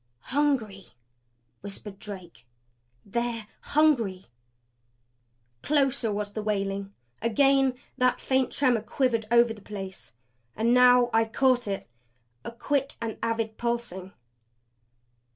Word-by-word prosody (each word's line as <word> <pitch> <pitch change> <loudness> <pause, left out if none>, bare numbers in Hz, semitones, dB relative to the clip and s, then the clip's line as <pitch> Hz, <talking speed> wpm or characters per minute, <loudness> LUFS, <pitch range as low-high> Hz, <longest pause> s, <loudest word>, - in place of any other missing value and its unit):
"Hungry!" 250 -10 0 0.7
whispered 200 0 -7
Drake. 175 - -10 0.6
"They're 235 +1 -2
HUNGRY!" 240 -12 +2 1.4
Closer 275 -6 +1
was 205 0 -3
the 215 - -3
wailing; 200 -1 -2 0.3
again 270 +3 +3 0.2
that 250 0 +3
faint 260 -1 +1
tremor 250 -5 +2
quivered 230 0 0
over 235 -1 +4
the 210 - -14
place. 195 - -8 0.4
And 230 +2 +2
now 250 -1 +6
I 225 0 +4
caught 245 +1 +2
it 195 -1 -4 0.6
a - - -6
quick 275 +3 -1
and 230 -1 -5
avid 225 -1 -2
pulsing. 235 -6 -3
230 Hz, 105 wpm, -27 LUFS, 205-250 Hz, 1.4 s, now